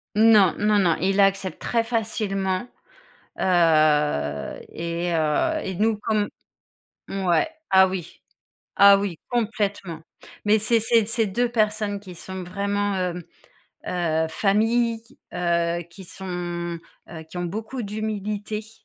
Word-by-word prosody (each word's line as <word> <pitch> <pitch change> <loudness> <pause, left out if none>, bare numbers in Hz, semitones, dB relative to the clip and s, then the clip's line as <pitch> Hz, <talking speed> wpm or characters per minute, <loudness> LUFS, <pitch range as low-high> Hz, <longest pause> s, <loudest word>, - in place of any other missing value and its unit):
Non, 215 -4 +6
non, 210 0 +2
non, 175 -4 +3
il 195 +3 +2
accepte 195 -1 +1
très 230 -1 0
facilement. 210 -3 -2 0.7
Heu 150 - +2
et 170 +1 -3
heu 165 - +1
et 190 - -4
nous, 215 +3 +1
comme 210 -1 0 0.8
mouais, 185 - +1 0.2
ah 190 0 +7
oui, 180 -3 -6 0.6
ah 200 0 +8
oui, 195 -4 -3
complètement. 205 -8 -2 0.4
Mais 215 +1 +4
c'est 225 +2 +2
c’est 225 -1 +3
c'est 225 0 +1
2 240 +5 0
personnes 215 -3 0
qui 185 -3 -11
sont 190 +2 -7
vraiment, 200 +2 -1
hem, 180 -1 -2 0.7
heu, 160 -3 0
famille, 225 +6 +1 0.3
heu, 170 -1 0
qui 190 +2 -12
sont, 175 -2 -5 0.3
heu, 160 -2 -8
qui - - -14
ont 175 - -2
beaucoup 220 +8 -5
d’humilité. 210 0 -4
195 Hz, 125 wpm, -24 LUFS, 175-215 Hz, 0.8 s, ah